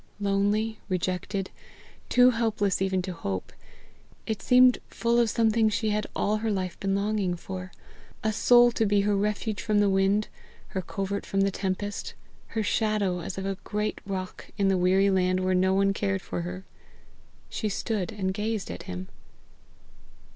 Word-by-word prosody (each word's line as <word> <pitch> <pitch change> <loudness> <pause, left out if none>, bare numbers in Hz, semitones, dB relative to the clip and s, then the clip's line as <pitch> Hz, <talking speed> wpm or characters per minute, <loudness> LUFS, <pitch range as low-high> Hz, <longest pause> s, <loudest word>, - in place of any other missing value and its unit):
Lonely, 205 +2 +1
rejected, 185 +1 -2 0.6
too 250 0 +6
helpless 220 -5 0
even 190 -1 +1
to 185 0 -4
hope, 95 - -4 0.7
it 220 -2 -3
seemed 250 0 +6
full 235 +1 +1
of 235 -2 +3
something 225 0 +3
she 220 0 0
had 210 0 -1
all 210 +1 +1
her 220 +1 -2
life 185 -3 -2
been 195 0 0
longing 200 -3 0
for 185 +1 -7 0.5
a 220 0 +1
soul 240 +2 +6
to 225 -2 +1
be 205 0 +3
her 205 0 +1
refuge 210 +1 -1
from 215 -2 +1
the 205 -1 +4
wind, 195 +2 +2 0.4
her 190 - -3
covert 195 +2 -3
from 195 - 0
the 195 0 +2
tempest, 195 +1 -3 0.3
her 220 -1 -2
shadow 210 -4 +1
as 175 +2 -6
of 190 - -3
a 195 -1 -3
great 210 +1 -2
rock 190 -1 -5
in 200 -2 +2
the 190 - +3
weary 190 +2 +4
land 185 -1 +2
where 185 0 +1
no 185 +1 +3
one 195 +1 +3
cared 195 -1 -1
for - - -4
her. 185 +2 -6 0.8
She 215 - -3
stood 205 -1 -2
and 190 -3 -2
gazed 210 - -2
at 90 - -7
him. 90 +1 -5
200 Hz, 170 wpm, -27 LUFS, 190-215 Hz, 0.8 s, too